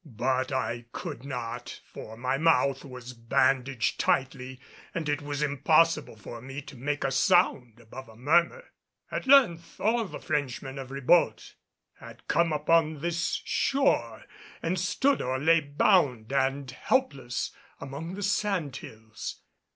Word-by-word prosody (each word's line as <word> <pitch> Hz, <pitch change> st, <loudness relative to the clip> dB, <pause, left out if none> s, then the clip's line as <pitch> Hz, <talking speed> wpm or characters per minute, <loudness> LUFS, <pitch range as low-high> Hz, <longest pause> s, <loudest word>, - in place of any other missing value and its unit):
But 130 Hz, -1 st, -1 dB
I 120 Hz, -3 st, -2 dB
could 120 Hz, -, -6 dB
not, 125 Hz, -4 st, -6 dB
for 110 Hz, +1 st, -10 dB
my 130 Hz, +2 st, -1 dB
mouth 145 Hz, -4 st, +3 dB
was 125 Hz, -2 st, -9 dB
bandaged 125 Hz, +2 st, +1 dB
tightly 130 Hz, -1 st, -1 dB, 0.4 s
and 165 Hz, -2 st, -2 dB
it 145 Hz, 0 st, 0 dB
was 145 Hz, 0 st, -3 dB
impossible 150 Hz, 0 st, +2 dB
for 115 Hz, +2 st, -9 dB
me 135 Hz, +3 st, -7 dB
to 140 Hz, -, -12 dB
make 145 Hz, +4 st, -2 dB
a 135 Hz, -, 0 dB
sound 135 Hz, -, +2 dB
above 120 Hz, +2 st, -11 dB
a 110 Hz, -, -15 dB
murmur. 170 Hz, -, +2 dB, 0.5 s
At -, -, -4 dB
length 220 Hz, -12 st, +4 dB
all 230 Hz, +3 st, +2 dB
the -, -, -7 dB
Frenchmen 135 Hz, -3 st, -3 dB
of 130 Hz, -1 st, -7 dB
Ribault 140 Hz, +5 st, +2 dB, 0.5 s
had -, -, -13 dB
come 170 Hz, -1 st, +2 dB
upon 155 Hz, 0 st, +2 dB
this 170 Hz, +1 st, -1 dB, 0.2 s
shore 120 Hz, -, +1 dB, 0.4 s
and 175 Hz, +2 st, 0 dB
stood 235 Hz, +10 st, +1 dB
or 130 Hz, +1 st, -1 dB
lay 165 Hz, +4 st, +4 dB
bound 145 Hz, -, +2 dB
and 135 Hz, 0 st, 0 dB
helpless 135 Hz, -, -1 dB, 0.3 s
among 145 Hz, +6 st, -6 dB
the 205 Hz, -, -5 dB
sand 195 Hz, -8 st, 0 dB
hills. 110 Hz, -1 st, -9 dB
140 Hz, 140 wpm, -28 LUFS, 125-165 Hz, 0.5 s, length